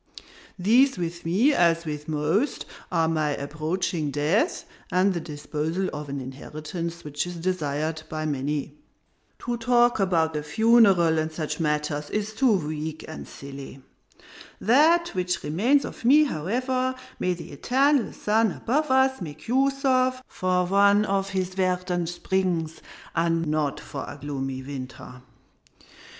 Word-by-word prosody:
These 240 +8 +4
with 170 -1 -4
me, 225 - +3
as 170 -5 +3
with 150 -1 -5
most, 160 - 0 0.3
are 165 -2 +2
my 155 -3 0
approaching 155 +2 -2
death, 160 - 0 0.3
and 185 +2 +3
the 175 - -2
disposal 160 +3 -3
of 150 -1 -6
an 140 0 -3
inheritance 155 +6 -6
which 150 +3 -3
is 175 - -6
desired 160 -3 -2
by 155 0 -3
many. 145 +1 -2 0.7
To 240 0 -1
talk 240 0 +3
about 165 -4 +2
the 150 - -2
funeral 195 -3 +4
and 155 0 -2
such 155 0 -4
matters 150 -1 -1
is 215 +1 -2
too 255 +2 +3
weak 155 -3 -3
and 155 - -8
silly. 135 -1 -10 0.8
That 320 - +4
which 180 -1 -2
remains 235 - +2
of - - -9
me, 285 +6 +6
however, 255 - -1 0.2
may 180 -1 0
the 170 - -10
eternal 265 - +2
sun 220 0 +1
above 300 +5 -1
us 265 -2 +3
make 155 -3 -8
use 275 +3 +1
of 255 -1 +2
for 180 -1 0
one 200 +2 +4
of 195 -1 0
his 190 -2 -1
verdant 180 -2 0
springs, 175 -3 -1 0.3
not 165 -3 0
for 140 - -6
a - - -8
gloomy 135 -2 -4
winter! 130 -2 -8
175 Hz, 135 wpm, -25 LUFS, 150-220 Hz, 0.8 s, me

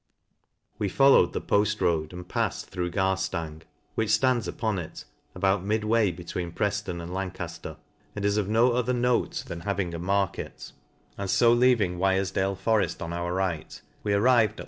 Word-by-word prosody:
We 100 - 0
fallowed 135 +7 +5
the - - -2
pott 105 0 +1
road, 80 -3 +1
and 90 0 -9
palled - - 0
through 90 -1 -4
Gar 95 +2 +1
■, 80 -4 -4 0.3
which 110 -1 -1
ftands 115 -1 +2
upon 105 +2 -2
it, 80 - -8 0.3
about 95 0 +1
midway 110 +1 +2
between 85 0 -5
PreJ'Un 100 -3 -2
and 85 +1 -7
Lancafler, 95 -1 -5 0.4
and 100 -1 -3
is 100 0 +2
of 105 -2 0
no 115 +3 +4
other 125 +1 0
note 125 0 0
than 85 - -6
having 100 -2 -2
a 85 - -4
market 95 +2 -2 0.2
\ - - -36
and 100 -1 -3
fo 115 +4 +5
leaving 120 -8 +3
Wirejdale 95 0 +1
foreft 100 -2 +1
on 85 +1 -5
our 85 0 -2
right, 90 -4 -2 0.2
we 105 - 0
arrived 115 0 +4
at - - -25
Vol. - - -11
95 Hz, 175 wpm, -27 LUFS, 90-110 Hz, 0.4 s, fallowed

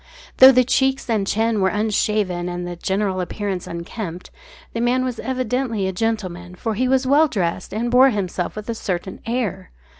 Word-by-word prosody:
Though 260 +1 +10
the 255 -1 +4
cheeks 265 +2 +1
and 205 -3 0
chin 220 0 +1
were 190 - +3
unshaven 205 -4 0
and 175 0 -4
the 175 - -5
general 190 +1 -1
appearance 190 0 -4
unkempt, 170 +1 -6 0.4
the 230 - -2
man 250 +2 +2
was 250 -3 -4
evidently 250 -5 -1
a - - -1
gentleman, 180 -4 -3
for 220 +4 -3
he 250 +5 0
was 260 0 +2
well 290 +4 +5
dressed 185 - -2
and 235 +3 -2
bore 255 +2 +7
himself 185 -5 -3
with 215 0 -7
a 230 - -1
certain 190 -3 -4
air. 235 - -2
215 Hz, 180 wpm, -21 LUFS, 185-250 Hz, 0.4 s, Though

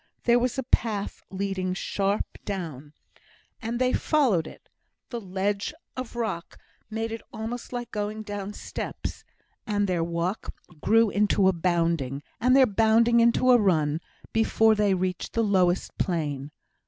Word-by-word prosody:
There 240 0 +5
was 250 +1 -1
a 265 - -1
path 215 -4 0
leading 190 -1 -2
sharp 200 +1 0 0.2
down, 155 -7 -5 0.7
and 230 +1 -2
they 255 +1 +2
followed 240 - +2
it; - - -13 0.4
the 235 -2 -4
ledge 200 +6 -2 0.2
of 255 -2 -6
rock 215 -8 -3 0.3
made 225 +1 -3
it 225 - -5
almost 230 +2 -5
like 245 -1 -5
going 210 +1 -3
down 205 -1 -5
steps, - - -6 0.4
and 205 -1 +1
their 175 -3 +1
walk 170 +4 -2 0.3
grew 225 -1 +4
into 205 -1 +3
a 190 - +4
bounding, 165 -6 0 0.2
and 255 +2 +4
their 270 -1 +7
bounding 230 +2 +4
into 235 +2 +4
a 245 - +7
run, 160 -5 +2 0.3
before 225 0 +4
they 205 -2 +2
reached 185 -1 -2
the 230 - +2
lowest 185 -3 +2
plane. 145 -6 -1
205 Hz, 145 wpm, -26 LUFS, 180-230 Hz, 0.7 s, their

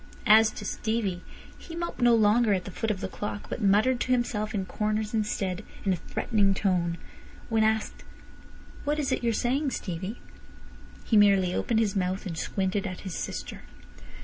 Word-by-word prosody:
As 220 +1 +7
to 210 - -7
Stevie, 210 -5 -2 0.4
he 330 - -9
moped 340 -5 -4
no 240 -1 +6
longer 215 0 +4
at 185 - -4
the 195 - -6
foot 225 +4 -2
of 200 -3 -2
the - - -2
clock, 205 0 -5
but - - -4
muttered 215 +5 +3
to 255 - -1
himself 220 -3 0
in 195 -2 -1
corners 215 +2 -2
instead 210 -3 -1 0.2
in 190 - +3
a - - -2
threatening 200 +1 0
tone. 175 -4 0 0.5
When 225 -1 +3
asked 220 0 0 0.8
"What 295 +1 0
is 290 -3 -1
it - - -1
you're 235 - +2
saying, 265 +6 0
Stevie?" 190 0 -5 0.8
he 225 - 0
merely 195 -3 +5
opened 225 +3 +1
his 210 -3 0
mouth, 185 +1 -1
and 175 -4 -4
squinted 195 +4 -1
at 185 -1 -6
his 190 -3 -6
sister. - - -5
210 Hz, 175 wpm, -27 LUFS, 190-230 Hz, 0.8 s, As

